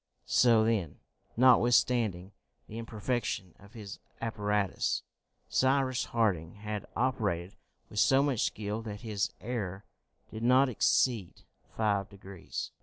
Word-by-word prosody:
So 115 -3 +4
then, 105 -9 0 0.4
notwithstanding 120 -6 +3 0.4
the 110 - -7
imperfection 115 -5 -3
of 100 +1 -17
his 105 -3 -9 0.2
apparatus, 105 -3 -1 0.4
Cyrus 130 -1 +1
Harding 95 -8 0
had 105 0 -5
operated 105 -8 -1 0.3
with 105 - -4
so 135 +4 +5
much 140 -6 0
skill 105 +1 -2
that 105 -2 -7
his 105 -4 -1
error 105 -5 -4 0.5
did 110 - -7
not 130 +3 +4
exceed 110 -2 +1 0.3
five 100 -3 +1
degrees. 95 -2 -7
110 Hz, 110 wpm, -30 LUFS, 100-120 Hz, 0.5 s, so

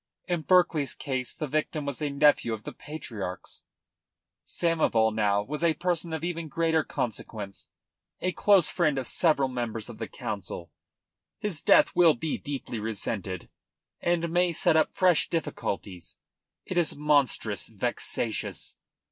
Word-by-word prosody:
In 175 -3 0
Berkeley's 165 -6 +3
case 130 -3 -2
the 155 - -3
victim 150 +1 -2
was 140 +1 -4
a 150 - 0
nephew 140 -4 +3
of 110 -1 -6
the - - -6
Patriarch's. 115 -12 -6 0.8
Samoval, 145 -10 +2
now, 105 -2 +2
was 150 +8 -4
a 165 -2 +3
person 175 -1 -1
of 160 -1 -3
even 170 -2 -2
greater 160 +1 +1
consequence, 105 -5 -5 0.5
a 185 - 0
close 195 -1 +4
friend 155 -6 +1
of 130 - -2
several 150 -3 +2
members 120 -4 -4
of - - -10
the - - -3
Council. 90 -4 -5 0.7
His 185 -8 -3
death - - +5
will 170 -3 +6
be 155 +6 -3
deeply 140 -5 -5
resented, 100 -4 -3 0.5
and 170 -1 0
may 175 0 +2
set 160 - +3
up 160 - +3
fresh 180 -3 +3
difficulties. 100 - -4 0.5
It 180 - 0
is 160 -4 +1
monstrous 140 -9 +1
vexatious." 115 0 -1
145 Hz, 140 wpm, -28 LUFS, 110-165 Hz, 0.8 s, will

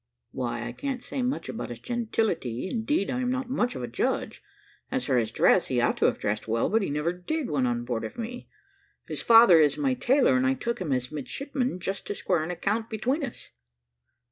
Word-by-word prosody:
"Why, 120 -1 -3
I 120 - -4
can't 265 - -4
say 265 - -3
much 250 +2 -1
about 225 - -5
his 120 - -6
gentility; 215 - -1
indeed, 225 +2 0
I 250 - -1
am 250 - 0
not 260 0 -2
much 250 -2 0
of - - -5
a - - -3
judge. - - -2 0.5
As 260 0 -2
for 135 - +1
his 115 -3 +1
dress, - - +4
he - - 0
ought - - +2
to - - +2
have - - +2
dressed 105 +2 -2
well, 115 - +1
but 225 +1 +3
he 195 - -1
never 150 +4 0
did 260 - -3
when 135 -4 +1
on 120 0 -1
board 120 -2 -2
of 110 - -6
me. 240 +1 -6 0.6
His - - -5
father 225 -7 +8
is 150 -2 +3
my 275 -3 +1
tailor, 255 - +3
and 130 0 +2
I 135 - +2
took 235 - -3
him 165 -6 -2
as 125 0 -1
midshipman, 250 - -3
just 195 +2 -4
to 205 - -3
square 180 -5 0
an 160 - -5
account 210 +5 -1
between 255 +7 -1
us." 270 - -7
205 Hz, 220 wpm, -27 LUFS, -, 0.6 s, father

